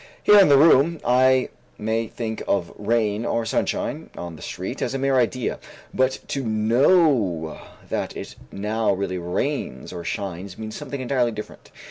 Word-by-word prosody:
Here 210 0 +8
in 190 - +6
the 140 - +7
room 155 +2 +5
I 130 +1 +4 0.3
may 110 +1 -1
think 110 -1 -5
of 85 -4 0
rain 110 0 0
or 115 -1 -1
sunshine 110 - -2
on 85 -1 -6
the - - -13
street - - -5
as - - -1
a - - +1
mere 135 0 +1
idea, 125 0 0 0.3
but 130 0 +1
to 140 - -2
know 110 - +2 0.3
that - - -3
it - - -7 0.2
now 105 +1 0
really 95 -1 -3
rains 90 - -3
or 85 -1 -6
shines 95 -1 -5
means 110 -1 -6
something 140 -2 -6
entirely 125 -2 +1
different. 105 -1 -9
115 Hz, 160 wpm, -23 LUFS, 100-130 Hz, 0.3 s, Here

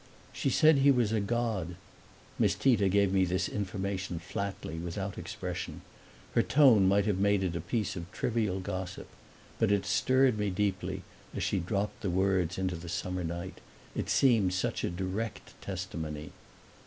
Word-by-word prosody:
"She - - 0
said 155 +2 +5
he 140 +1 +5
was 120 -5 +3
a 110 - +2
god." 105 -5 -1 0.6
Miss 100 -4 +3
Tita 105 -4 +3
gave 100 0 +3
me 95 -1 +4
this 90 +1 0
information 95 -2 -3
flatly, 90 -1 -4
without 95 +3 -4
expression; - - -5 0.5
her - - +4
tone 125 -9 +5
might 100 +1 +3
have 100 -3 0
made 100 0 +3
it 90 -2 -1
a 85 - -2
piece 105 +1 -2
of 85 +1 -7
trivial 110 -5 -1
gossip. 95 -1 -5 0.5
But 110 -2 +3
it 100 -1 +2
stirred 130 -3 +3
me 105 -1 +1
deeply 95 0 -1 0.3
as - - -2
she - - +1
dropped 100 +4 -2
the 100 - -1
words 90 -1 +1
into 95 -1 -1
the 85 0 -8
summer 90 +1 -2
night; 85 +2 -5 0.4
it - - -3
seemed 110 -9 +4
such 90 - -1
a - - +1
direct 95 +5 -4
testimony. 80 -5 -5
95 Hz, 165 wpm, -30 LUFS, 90-105 Hz, 0.6 s, said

